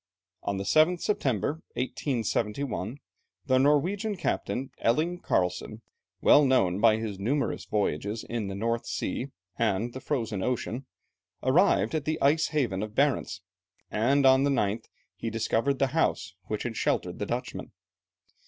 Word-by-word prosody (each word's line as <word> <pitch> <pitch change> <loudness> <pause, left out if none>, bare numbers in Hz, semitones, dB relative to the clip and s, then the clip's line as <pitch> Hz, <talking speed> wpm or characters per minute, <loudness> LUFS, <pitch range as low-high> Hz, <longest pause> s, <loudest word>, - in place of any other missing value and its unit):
On 100 - -2
the 95 - -2
7th 155 - +4
September, 145 - -1
1871, 120 -2 -2 0.5
the 130 -2 +3
Norwegian 180 +10 +2
Captain, 135 -5 -2
Elling 160 +9 +1
Carlsen, 90 - -1 0.4
well 150 - +7
known 100 -9 +3
by 110 -1 +5
his 110 -3 -4
numerous 140 +8 -1
voyages 105 +1 -1
in 115 -3 -3
the 95 - -4
North 115 +3 -1
Sea 130 - -2 0.3
and 115 +1 0
the 130 - -6
Frozen 115 -9 -2
Ocean, 125 +2 -2 0.6
arrived 165 +10 +3
at 155 -3 -1
the 155 +1 -1
ice 155 +3 +3
haven 120 -11 -1
of 105 0 -5
Barentz, 140 -6 +1 0.5
and 135 +6 +2
on 130 0 +6
the 140 - +2
9th 110 -4 0 0.3
he 115 - -4
discovered 115 +4 0
the 135 - +2
house 125 - 0
which 105 - -3
had 120 -2 -4
sheltered - - -1
the - - -2
Dutchmen. - - -4
120 Hz, 145 wpm, -28 LUFS, 105-140 Hz, 0.6 s, well